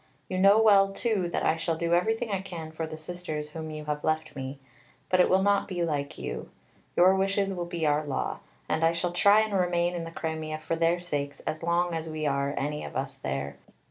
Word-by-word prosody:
You 185 - -2
know 200 +3 +7
well 200 -3 +6
too 195 -4 0
that - - -1
I 160 - +3
shall 165 0 -1
do 170 +1 0
everything 225 +6 +1
I 195 -1 0
can 165 -4 -7
for 160 0 -4
the 155 0 -7
Sisters 155 -2 -5
whom 160 0 -6
you 155 -1 -6
have 150 0 -3
left 155 -1 -1
me. 135 0 -5 0.5
But 185 - +3
it 180 - +5
will 190 +1 +4
not 200 0 +3
be 175 -3 -2
like 145 -4 -2
you. - - -5 0.5
Your 185 +2 +6
wishes 195 0 +1
will 175 -2 -4
be 170 -2 -2
our 150 0 +2
law. 145 -3 -2 0.3
And 160 +1 0
I 165 +1 +4
shall 175 +1 -1
try 200 +4 +6
and 220 -1 -2
remain 175 -2 +1
in 170 -1 -3
the 165 - -6
Crimea 160 -1 -4
for 155 +1 -2
their 165 +1 +2
sakes 145 -5 -3
as 155 - -4
long 170 +1 +1
as 165 0 -3
we 155 -1 -3
are 140 0 0
any 150 +2 -2
of - - -8
us 135 +1 -2
there. 70 - -4
165 Hz, 230 wpm, -28 LUFS, 155-185 Hz, 0.5 s, know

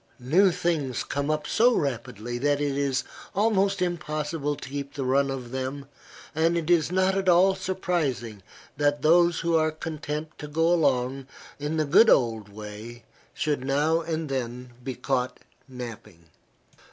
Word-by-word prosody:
New 165 +11 +4
things 165 -8 -1
come 140 +1 -3
up 155 -1 0
so 240 +2 +3
rapidly 120 -3 -3
that 145 +2 +1
it 145 -2 -1
is 140 -2 0 0.3
almost 200 -2 +2
impossible 155 -3 -2
to 130 - -9
keep 140 0 -5
the 135 -2 -3
run 135 +2 +2
of 130 -3 -5
them, 130 +2 -4 0.5
and 165 +2 +2
it 170 0 -1
is 170 -1 +3
not 185 +1 +2
at 190 -1 +1
all 180 +2 +5
surprising 165 - -2 0.4
that 145 0 +1
those 170 +1 +4
who 170 0 +1
are 155 -1 +3
content 155 -1 -5
to 150 - -6
go 165 +3 +2
along 135 -4 +1 0.3
in 150 +2 -2
the 155 - +1
good 175 +10 +6
old 110 -5 +2
way 105 +3 -9 0.3
should 150 -4 -1
now 150 +5 +2
and 160 -1 -3
then 125 -2 -4
be 130 0 -4
caught 125 0 -1 0.3
napping. 115 -9 -9
145 Hz, 155 wpm, -26 LUFS, 130-165 Hz, 0.5 s, good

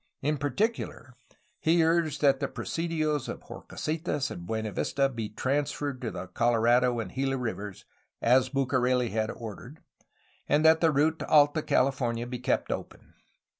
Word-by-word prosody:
In 150 +1 0
particular 145 - -2 0.5
he 165 +1 +3
urged 165 -3 +1
that 140 -2 +4
the - - -1
presidios 155 -4 -2
of - - -6
Horcasitas 155 -3 -3
and 85 0 -8
Buenavista 110 +5 0
be 115 -5 -5
transferred 140 +2 -2
to 120 - -2
the - - -6
Colorado 120 +1 +2
and 115 - -5
Gila 135 0 0
rivers, 105 -5 -5 0.3
as 125 +2 +4
Bucareli 125 -2 +1
had 110 0 -1
ordered, 120 +6 -8 0.7
and 150 +2 +3
that 160 0 +6
the 165 - +5
route 155 +2 +2
to - - -5
Alta 150 +1 +5
California 125 -5 +1
be 125 0 -5
kept 125 +1 0
open. - - -7
135 Hz, 145 wpm, -28 LUFS, 120-150 Hz, 0.7 s, that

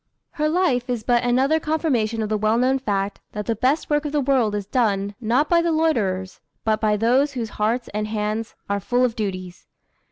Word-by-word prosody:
Her 305 -1 0
life 290 -8 +1
is 240 -3 -2
but 240 0 +2
another 260 +6 +2
confirmation 255 -9 0
of 210 - -3
the 215 - +1
well 215 +2 +2
known 260 +2 +2
fact, 200 -4 -2
that 210 -1 -4
the 230 - 0
best 260 +8 +1
work 295 0 +1
of 295 - -3
the 295 - +1
world 255 -6 +2
is 205 -1 -3
done, 205 -3 0
not 245 +7 +2
by 340 -1 +4
the 335 0 0
loiterers, 210 - 0 0.2
but 220 -1 +1
by 210 -1 +2
those 255 +6 +2
whose 235 -4 -3
hearts 230 +3 +1
and 210 0 -2
hands 215 +1 -3
are 200 0 0
full 245 +5 +1
of 235 -2 -2
duties. 185 -4 -5
235 Hz, 210 wpm, -22 LUFS, 210-275 Hz, 0.2 s, by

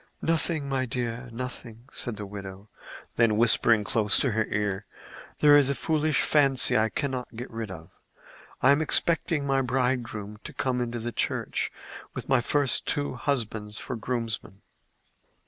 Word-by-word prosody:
"Nothing, 160 -2 +2
my 130 -1 -1
dear—nothing," 120 -1 -5
said 120 -3 -1
the 105 - -5
widow; 100 0 -9 0.5
then, 115 -3 +4
whispering 115 -1 +4
close 105 0 +2
to 130 - +1
her 110 0 +1
ear, 105 -2 -2 0.5
"There 145 -1 +8
is 140 -2 +6
a 140 - +1
foolish 155 -1 +1
fancy 140 -3 +3
that 110 - +4
I - - -2
cannot 130 -1 -3
get 125 +3 -7
rid 115 -2 -5
of. 80 -3 -10 0.7
I 130 - +7
am 140 +2 +4
expecting 160 -1 +1
my 135 -1 +2
bridegroom 125 -5 -1
to - - -8
come 125 -1 -1
into 120 0 -3
the 120 +1 -4
church - - -1 0.4
with - - -5
my 130 -2 +4
two - - -1
first 145 -3 +2
husbands 120 -7 -2
for - - -5
groomsmen." 110 -3 -4
120 Hz, 155 wpm, -27 LUFS, 110-135 Hz, 0.7 s, There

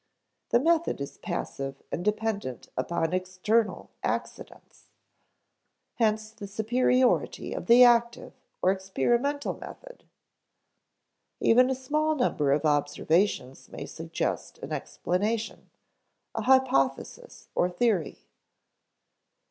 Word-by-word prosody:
The 235 - +4
method 330 - +1
is 140 - -7
passive 135 0 -5
and 175 - -3
dependent 210 - -2
upon 165 +5 -1
external 185 +5 0
accidents. - - -5 1.1
Hence 215 -1 +1
the 220 -2 -9
superiority 245 +4 +1
of - - -6
the 240 +1 +8
active 235 -1 +3 0.3
or 185 - +5
experimental 235 - 0
method. - - -12 1.4
Even 250 +3 +5
a 265 - 0
small 305 +4 0
number 150 - +1
of 150 +3 +1
observations 145 0 0
may - - -7
suggest - - -4
an - - -6
explanation 210 +5 -2 0.6
a - - -3
hypothesis 265 - +1
or 180 - +2
theory. 180 -3 -1
220 Hz, 100 wpm, -27 LUFS, 180-250 Hz, 1.4 s, the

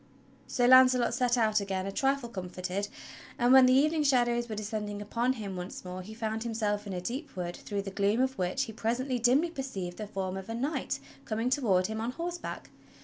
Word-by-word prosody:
So 245 - +1
Launcelot 255 -1 +6
set 250 0 +2
out 215 -2 +3
again 190 -2 -2
a 195 - -3
trifle 270 +3 0
comforted, 185 -1 -4 0.5
and 245 +2 +4
when 260 -1 +8
the 255 - +5
eve 285 +4 +4
ning 320 -1 0
shadows 240 -4 +2
were 215 - -3
descending 210 -1 -4
upon 235 +5 0
him 205 -6 -6
once 180 +1 -7
more 180 +1 -5
he 215 +4 -10
found 220 -1 -3
him 230 -1 -3
self 210 -2 -1
in 195 - -4
a 180 - -2
deep 260 - -5
wood 175 -1 -4
through 200 -2 -4
the 195 - -6
gloom 200 +4 +1
of 260 +1 +1
which 185 +9 0
he 225 -4 -6
presently 245 +3 -1
dimly 265 +8 +3
perceived 200 - -5
the 215 - -5
form 190 -2 -3
of 190 +2 -8
a 225 - -3
knight 275 +7 -2 0.2
coming 225 +3 -1
toward 205 -10 +2
him 220 +2 -3
on 235 +2 -2
horseback. 345 +3 -5
225 Hz, 215 wpm, -30 LUFS, 200-255 Hz, 0.5 s, when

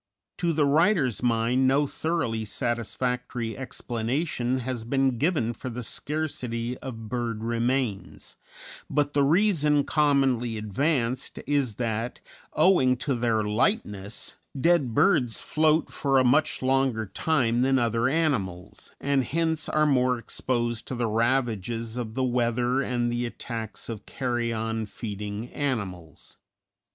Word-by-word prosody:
To 170 -1 +1
the 150 -2 +2
writer's 145 - +3
mind 120 +2 +2
no 140 +3 +3
thoroughly 140 -8 -1
satisfactory 120 +1 -2
explanation 125 +1 -2
has 125 -2 -4
been 130 0 +1
given 145 -8 +1
for 130 +3 -6
the 125 +1 -5
scarcity 125 -5 -3
of 115 -4 -7
bird 115 -2 -3
remains; 115 -2 -2 0.5
but 145 0 +1
the 145 - +3
reason 150 -2 +3
commonly 135 -7 +2
advanced 125 +4 -1
is 140 -7 0
that, 115 +1 -2 0.3
owing 155 -7 +4
to 135 +3 -1
their 115 -3 +1
lightness, 105 - -1 0.2
dead 145 -7 +2
birds 125 - +3
float 155 +1 +2
for 135 -1 +1
a 130 - +5
much 130 +3 +2
longer 130 -4 +2
time 120 +2 +1
than 135 +1 +3
other 115 0 +1
animals, 120 - -2
and 140 -1 +1
hence 160 +3 -1
are 155 0 +3
more 125 -3 +3
exposed 120 -1 -2
to 130 - -4
the 120 -1 0
ravages 115 -1 0
of 115 -3 -4
the 130 - 0
weather 125 +1 +1
and 120 -3 0
the 120 0 -1
attacks 115 -2 -6
of 110 -3 -7
carrion 115 -3 -2
feeding 105 +1 -5
animals. 95 - -4
125 Hz, 125 wpm, -26 LUFS, 115-140 Hz, 0.5 s, a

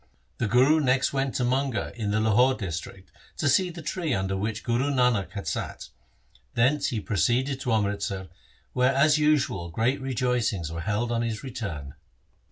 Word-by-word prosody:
The 115 - +1
Guru 130 +8 +4
next 130 -2 +2
went 135 -1 -1
to 125 - 0
Manga 130 0 -1
in 110 -3 -3
the 105 +1 +1
Lahore 115 +5 +4
district 95 -1 -6 0.3
to 145 - 0
see 180 +7 +3
the 170 -1 -9
tree 160 -4 -1
under 95 0 -1
which 105 +3 -3
Guru 120 +4 0
Nanak 125 -9 +1
had 100 -1 -5
sat. - - -4 0.7
Thence 135 +5 +3
he 115 - -2
proceeded 125 +6 0
to 125 - -2
Amritsar 100 -3 -1 0.4
where 130 +1 +2
as 150 +2 +4
usual 145 - +1
great 115 +10 0
rejoicings 125 - -1
were 85 0 -4
held 105 +6 -1
on 115 -1 0
his 115 -3 -3
return. 85 - -5
120 Hz, 170 wpm, -26 LUFS, 100-135 Hz, 0.7 s, Guru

